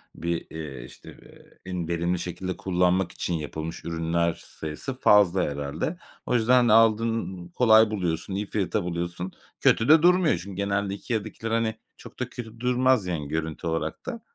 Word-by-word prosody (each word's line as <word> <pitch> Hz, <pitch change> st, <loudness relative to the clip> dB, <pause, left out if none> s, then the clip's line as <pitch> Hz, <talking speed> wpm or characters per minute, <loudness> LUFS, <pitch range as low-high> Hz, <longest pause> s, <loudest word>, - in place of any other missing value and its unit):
bir, 85 Hz, 0 st, -3 dB
eee, 70 Hz, -6 st, -7 dB
işte, -, -, -13 dB
eee, -, -, -19 dB
en 85 Hz, -3 st, -3 dB
verimli 85 Hz, +1 st, 0 dB
şekilde 90 Hz, +1 st, -4 dB
kullanmak 90 Hz, -1 st, +1 dB
için 90 Hz, -, -3 dB
yapılmış 80 Hz, +1 st, -5 dB
ürünler 85 Hz, 0 st, 0 dB
sayısı 80 Hz, -, -7 dB
fazla 100 Hz, -3 st, +5 dB
herhâlde. 70 Hz, -, -3 dB, 0.3 s
O 125 Hz, -, 0 dB
yüzden 120 Hz, +1 st, +4 dB
de -, -, +6 dB
aldın 115 Hz, -5 st, +2 dB
kolay 110 Hz, +1 st, +5 dB
buluyorsun, 90 Hz, -2 st, -2 dB
iyi 105 Hz, +1 st, -2 dB
fiyata 100 Hz, 0 st, -1 dB
buluyorsun. 85 Hz, +1 st, -4 dB, 0.3 s
Kötü 115 Hz, +6 st, +3 dB
de 155 Hz, 0 st, +8 dB
durmuyor 180 Hz, -1 st, +4 dB
çünkü 100 Hz, -2 st, -8 dB
genelde 100 Hz, 0 st, -1 dB
IKEA'dakiler, 110 Hz, +1 st, -4 dB
hani, 115 Hz, -1 st, +1 dB, 0.2 s
çok -, -, -13 dB
da -, -, -2 dB
kötü 115 Hz, -1 st, -9 dB
durmaz, 125 Hz, -3 st, +2 dB
yani, 75 Hz, -5 st, -3 dB
görüntü 80 Hz, +1 st, -3 dB
olarak 80 Hz, -1 st, -3 dB
da. 235 Hz, -3 st, -5 dB
95 Hz, 160 wpm, -26 LUFS, 85-115 Hz, 0.3 s, de